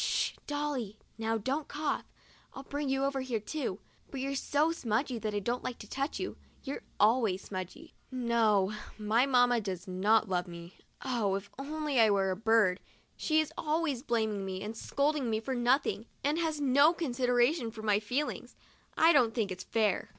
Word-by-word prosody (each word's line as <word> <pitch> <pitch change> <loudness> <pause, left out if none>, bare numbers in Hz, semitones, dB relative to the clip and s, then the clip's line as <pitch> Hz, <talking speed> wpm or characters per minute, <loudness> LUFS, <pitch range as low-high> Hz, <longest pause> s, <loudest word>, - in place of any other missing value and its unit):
Sh, - - +1
Dolly! 290 -8 -2 0.2
Now 225 0 0
don't 270 +8 -2
cough. 295 -1 -3 0.4
I'd 270 +1 -9
bring 285 -1 -2
you 270 0 +1
over 275 -1 0
here 250 -4 -2
too, 225 -2 -3 0.3
but 275 - -6
you're 275 +1 -2
so 290 +3 +1
smudgy 240 -3 -1
that 215 -1 -3
I - - +1
don't 240 +5 -2
like 255 -2 -4
to 210 - -11
touch 275 +6 -3
you. - - -4 0.3
You're 275 0 -5 0.2
always 215 -3 +3
smudgy." 190 - -7 0.2
No; 225 -5 +2 0.2
my 220 +5 +2
mamma 245 -3 +4
does 190 -2 -5
not 210 +4 +3
love 180 -1 -1
me. 170 +1 -9 0.3
Oh, 225 -7 +1
if 200 +1 -6
I 275 - -5
only 295 -7 +2
were 195 -2 +2
a - - -1
bird! 215 -3 +3 0.4
She 315 0 +2
is 310 - -5
always 305 -4 0
blaming 220 -6 0
me 190 0 -4
and 215 +2 -5
scolding 280 +1 0
me 220 -1 +1
for 260 +4 -3
nothing, 240 -2 +1 0.2
and 295 +4 +1
has 320 -3 -1
no 285 +4 +5
considera 245 -3 +2
tion 245 -9 -4
for 220 -1 -9
my 210 -1 +3
feelings. 250 +8 -3 0.4
I 325 +2 +6
don't 240 -6 +4
think 215 -5 0
it's 185 0 -5
fair. 215 -4 +1
240 Hz, 185 wpm, -31 LUFS, 210-280 Hz, 0.4 s, I